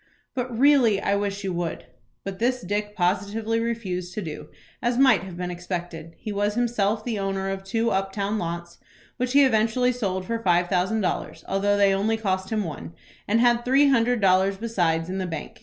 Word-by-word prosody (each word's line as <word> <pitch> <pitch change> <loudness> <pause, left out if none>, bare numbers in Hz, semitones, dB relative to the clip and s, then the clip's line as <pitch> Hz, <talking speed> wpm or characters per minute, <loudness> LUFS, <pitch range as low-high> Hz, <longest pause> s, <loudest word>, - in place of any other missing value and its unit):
"But 255 -1 -3
really 255 -6 +5
I 200 - +1
wish 200 0 -2
you 190 -2 -2
would." 170 -7 -3 0.4
But 195 -1 -6
this 250 +2 +1
Dick 210 +2 -3
positively 205 +5 0
refused 190 -7 -3
to 215 - -2
do, 155 -3 -7 0.3
as 240 0 0
might 260 -7 +5
have 185 -2 -9
been 180 0 -3
expected. 175 -2 -6
He 215 - -6
was 205 +1 0
himself 225 -3 0
the 230 -4 -2
owner 195 0 -2
of 195 0 -5
two 225 +4 0
up 195 0 0
town 205 +2 -2
lots, 170 0 -5 0.4
which 250 0 -1
he 285 0 +7
eventually 230 +1 +2
sold 190 -7 -2
for 230 +3 -2
five 175 -3 +2
thousand 190 +4 +1
dollars, 185 - -3
though 205 +1 +1
they 200 -1 +4
only 215 +3 +1
cost 190 -3 -2
him 215 -2 0
one, 165 0 -7 0.3
and 225 +3 +2
had 240 -1 +3
three 275 +3 +4
hundred 245 -2 +2
dollars 190 +1 +3
besides 175 -7 0
in 190 +1 -3
the 185 - -2
bank. 165 - -7
200 Hz, 195 wpm, -25 LUFS, 185-230 Hz, 0.4 s, he